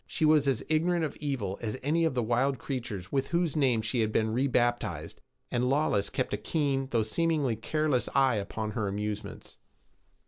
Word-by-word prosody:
She 155 Hz, -, 0 dB
was 150 Hz, -2 st, +4 dB
as 130 Hz, -5 st, +1 dB
ignorant 165 Hz, +2 st, +2 dB
of 150 Hz, -, -5 dB
evil 125 Hz, -10 st, -3 dB
as 115 Hz, +1 st, -3 dB
any 165 Hz, +4 st, +2 dB
of 160 Hz, -, 0 dB
the 125 Hz, -, +1 dB
wild 125 Hz, +4 st, +1 dB
creatures 115 Hz, -9 st, -5 dB
with 135 Hz, -1 st, 0 dB
whose 170 Hz, -2 st, 0 dB
names 125 Hz, -7 st, +2 dB
she 120 Hz, +2 st, 0 dB
had 110 Hz, -1 st, +1 dB
been 110 Hz, 0 st, +1 dB
rebaptized, 120 Hz, -1 st, 0 dB, 0.3 s
and 125 Hz, +1 st, +1 dB
Lawless 135 Hz, -8 st, +1 dB
kept -, -, -2 dB
a -, -, +1 dB
keen 135 Hz, +3 st, 0 dB
though 115 Hz, -4 st, +2 dB
seemingly 150 Hz, 0 st, 0 dB
careless 145 Hz, +3 st, 0 dB
eye 135 Hz, -4 st, +4 dB
upon 105 Hz, +2 st, -3 dB
her 110 Hz, -2 st, -2 dB
amusements. 105 Hz, +1 st, -5 dB
130 Hz, 180 wpm, -29 LUFS, 110-145 Hz, 0.3 s, was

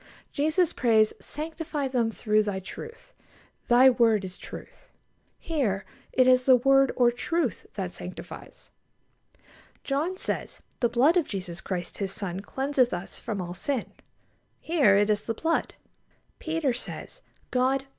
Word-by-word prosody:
Jesus 315 Hz, +4 st, +1 dB
prays: 220 Hz, -3 st, +3 dB
"Sanctify 310 Hz, -1 st, -4 dB
them 245 Hz, -3 st, +1 dB
through 215 Hz, -1 st, +1 dB
Thy 205 Hz, -2 st, -2 dB
truth: 455 Hz, -, -10 dB, 0.5 s
Thy 245 Hz, +2 st, +7 dB
word 230 Hz, -5 st, +4 dB
is 185 Hz, 0 st, -9 dB
truth." -, -, -11 dB, 0.5 s
Here 230 Hz, -, -1 dB, 0.3 s
it 255 Hz, -, +4 dB
is 255 Hz, 0 st, +4 dB
the 260 Hz, -, +8 dB
word, 270 Hz, +2 st, +4 dB
or 245 Hz, -1 st, +4 dB
truth, 280 Hz, +2 st, -2 dB
that 190 Hz, -3 st, -4 dB
sanctifies. 180 Hz, -, -10 dB, 1.1 s
John 310 Hz, +7 st, -1 dB
says: -, -, -3 dB, 0.2 s
"The 240 Hz, -, +2 dB
blood 280 Hz, +10 st, +4 dB
of 335 Hz, -, +1 dB
Jesus 185 Hz, -3 st, -5 dB
Christ 180 Hz, -2 st, -5 dB
His 195 Hz, -2 st, -2 dB
Son 195 Hz, -3 st, -3 dB
cleanseth 265 Hz, +1 st, 0 dB
us 175 Hz, +2 st, -7 dB
from 205 Hz, -5 st, -4 dB
all 175 Hz, 0 st, -6 dB
sin." 255 Hz, +6 st, -3 dB, 0.7 s
Here 290 Hz, -, +3 dB
it 205 Hz, +1 st, +3 dB
is 205 Hz, 0 st, -1 dB
the 230 Hz, -, -2 dB
blood. 330 Hz, +7 st, -1 dB, 0.6 s
Peter 320 Hz, -5 st, 0 dB
says: 250 Hz, -, -7 dB, 0.3 s
"God... 260 Hz, +2 st, +1 dB
245 Hz, 140 wpm, -27 LUFS, 205-285 Hz, 1.1 s, the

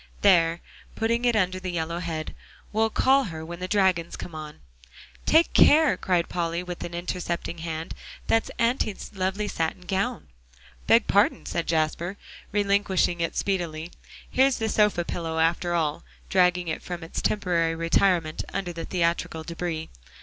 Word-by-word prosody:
"There," 170 Hz, -4 st, +4 dB, 0.3 s
putting 230 Hz, +2 st, 0 dB
it 240 Hz, -2 st, +3 dB
under 185 Hz, -3 st, +1 dB
the 185 Hz, 0 st, -5 dB
yellow 170 Hz, 0 st, -2 dB
head, 165 Hz, -2 st, -4 dB, 0.4 s
"we'll 220 Hz, +1 st, +2 dB
call 265 Hz, +4 st, +3 dB
her 160 Hz, -4 st, -6 dB
when 170 Hz, +1 st, -7 dB
the 185 Hz, -, -3 dB
dragons 185 Hz, -4 st, +2 dB
come 175 Hz, -, -8 dB
on." 155 Hz, -1 st, -8 dB, 0.7 s
"Take 325 Hz, +2 st, +4 dB
care," 310 Hz, -1 st, +6 dB
cried 180 Hz, -3 st, 0 dB
Polly, 170 Hz, 0 st, -2 dB
with 180 Hz, -1 st, -6 dB
intercepting 170 Hz, 0 st, -4 dB
hand, 160 Hz, 0 st, -4 dB, 0.3 s
"that's 225 Hz, -, +2 dB
Auntie's 230 Hz, -3 st, 0 dB
lovely 190 Hz, +2 st, -1 dB
satin 165 Hz, -1 st, -2 dB
gown." 180 Hz, -, -2 dB, 0.6 s
"Beg -, -, +5 dB
pardon," -, -, +2 dB
said 170 Hz, -, -2 dB
Jasper, 165 Hz, +4 st, 0 dB, 0.3 s
relinquishing 200 Hz, -4 st, +1 dB
it 165 Hz, -, -1 dB
speedily. 170 Hz, -4 st, -2 dB, 0.4 s
"Here's 265 Hz, 0 st, +3 dB
the 225 Hz, -1 st, -1 dB
sofa 210 Hz, -5 st, +2 dB
pillow, 165 Hz, -2 st, -3 dB
after 170 Hz, +2 st, +1 dB
all," 155 Hz, -3 st, -1 dB, 0.3 s
dragging 180 Hz, -1 st, +3 dB
it 160 Hz, -, -3 dB
from 175 Hz, -2 st, -6 dB
its 165 Hz, -, -5 dB
temporary 170 Hz, -5 st, +1 dB
retirement 165 Hz, -1 st, +1 dB
under 190 Hz, -3 st, -3 dB
the 165 Hz, 0 st, -5 dB
theatrical 170 Hz, -2 st, -1 dB
debris. 170 Hz, -1 st, -4 dB
175 Hz, 150 wpm, -26 LUFS, 165-195 Hz, 0.7 s, care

